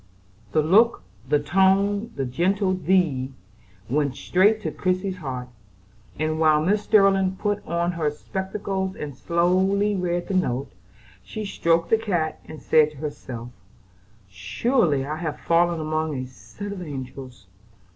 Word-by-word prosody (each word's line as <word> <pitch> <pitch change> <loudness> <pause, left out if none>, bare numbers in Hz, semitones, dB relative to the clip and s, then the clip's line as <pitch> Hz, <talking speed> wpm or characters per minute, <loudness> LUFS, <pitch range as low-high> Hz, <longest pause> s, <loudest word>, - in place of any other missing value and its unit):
The 155 - +2
look, 215 - +4 0.3
the 150 - +4
tone, 195 +7 +2
the 135 - -2
gentle 185 - +1
"thee," 165 -8 +1 0.5
went 140 +1 0
straight 195 +9 +3
to 155 - -2
Christie's 185 +4 -1
heart; 130 -6 -5 0.7
and, 155 +1 -1
while 155 -1 +5
Mrs. 195 +7 +2
Sterling 195 -3 +3
put 205 +1 -2
on 170 +1 0
her 165 -3 0
spectacles 190 +4 -4
and 145 -3 -6
slowly 190 +6 +2
read 175 -1 -1
the - - -3
note, 140 -8 0 0.5
she 215 -1 -6
stroked 170 -3 +1
the 225 - +5
cat 175 -8 -1
and 155 - -9
said 155 -1 +4
to 150 - -16
herself: 130 -5 -6 0.8
"Surely, 135 - 0
I 155 +2 -4
have 160 -2 -4
fallen 170 0 +2
among 155 0 -1
a 130 - -3
set 200 +10 -9
of 195 -2 -6
angels. 130 - -8
170 Hz, 140 wpm, -24 LUFS, 150-195 Hz, 0.8 s, while